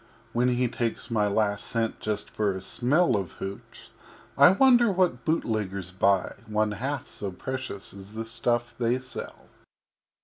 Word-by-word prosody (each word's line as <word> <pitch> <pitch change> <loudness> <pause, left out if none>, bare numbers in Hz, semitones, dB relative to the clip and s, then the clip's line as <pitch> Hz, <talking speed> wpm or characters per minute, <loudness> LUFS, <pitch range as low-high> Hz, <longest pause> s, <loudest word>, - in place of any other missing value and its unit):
When 120 +1 +2
He 125 0 +2
takes 115 0 -3
my 105 -2 +2
last 100 0 +1
Cent 115 -1 -1
for - - -30
just 105 -1 -2
a 100 -3 +1
Smell 130 - +2
Of 95 -5 -2
Hooch, 95 +1 -8 0.4
I - - +8
wonder 240 +2 +5
what 180 -10 +1
Bootleggers 105 - -1
buy 95 0 +2
One 105 0 +1
half 135 +5 -3
so 100 -2 -6
precious 130 -1 -6
as 100 +1 -12
the 110 +1 -4
Stuff 120 +1 -1
they 120 +1 +2
sell. 130 0 -8
115 Hz, 150 wpm, -27 LUFS, 100-125 Hz, 0.4 s, I